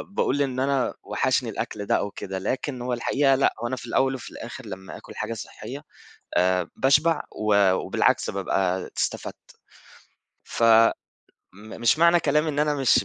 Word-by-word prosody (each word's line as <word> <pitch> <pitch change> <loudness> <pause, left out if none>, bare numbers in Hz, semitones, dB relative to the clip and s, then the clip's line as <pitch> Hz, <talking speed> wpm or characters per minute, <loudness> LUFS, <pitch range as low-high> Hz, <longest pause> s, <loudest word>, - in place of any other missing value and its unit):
باقول 145 -5 +1
إن 130 -2 -1
أنا 135 -1 +1
وحشني - - 0
الأكل 105 -1 -4
ده - - +2
أو 100 - -1
كده، 95 0 -5
لكن 130 +5 -3
هو 125 0 -2
الحقيقة 135 +3 +2
لأ، 135 - +2
هو 120 - 0
أنا 130 - -2
في 120 - -9
الأول 135 +3 +1
وفي 130 - -8
الآخر 120 +2 -9
لمّا 95 -2 -8
آكُل - - -13
حاجة - - -3
صحية - - -8 0.5
آآ 90 -1 +2
باشبع، 150 +4 +3
و 100 -3 +3
وبالعكس - - +1
بابقى 95 -1 -1
استفدت. - - -4 0.9
ف - - -4
م 115 0 +7 0.9
مش 120 +6 +3
معنى 170 +1 +5
كلامي 150 +2 +1
إن 145 -1 -3
أنا 150 0 +2
مش 135 -3 +3
125 Hz, 165 wpm, -25 LUFS, 105-140 Hz, 0.9 s, م